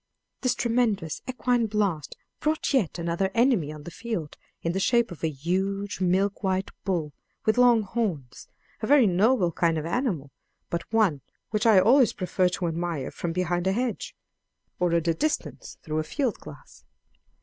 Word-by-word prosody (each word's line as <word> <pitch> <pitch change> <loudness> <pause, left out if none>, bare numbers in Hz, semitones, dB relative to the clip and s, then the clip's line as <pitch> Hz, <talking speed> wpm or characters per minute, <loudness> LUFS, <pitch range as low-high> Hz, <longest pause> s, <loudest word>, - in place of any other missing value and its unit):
This 255 -2 +1
tremendous 225 -9 0
equine 245 -2 +1
blast 200 -9 -1 0.2
brought 310 0 0
yet 220 - +1
another 170 +3 -1
enemy 230 - +3
on 150 -1 -9
the 170 - -8
field 220 -10 -5 0.3
in 170 - 0
the 190 - -1
shape 235 +2 +2
of 170 - -10
a 160 - +2
huge 190 +7 -2
milk 190 +2 +1
white 190 -1 -1
bull 165 -7 -1 0.3
with 220 +3 +2
long 240 -3 +5
horns: 190 - -3 0.3
a 215 - -2
very 285 -3 +6
noble 195 0 +3
kind 165 0 +1
of 155 - -3
animal, 170 - -2 0.4
but 170 +3 -4
one 205 -11 +2 0.3
which 215 +2 +1
I 215 -3 +7
always 245 +5 +5
prefer 185 0 +1
to 180 0 -3
admire 165 -3 -3
from 170 - -4
behind 175 +1 -1
a 190 - +2
hedge, 245 +2 -3 0.6
or 180 -1 +2
at 170 0 +1
a 165 - +3
distance 305 - -3
through 155 -1 -2
a - - 0
field 250 - -2
glass. 150 -2 -13
190 Hz, 170 wpm, -26 LUFS, 170-230 Hz, 0.6 s, I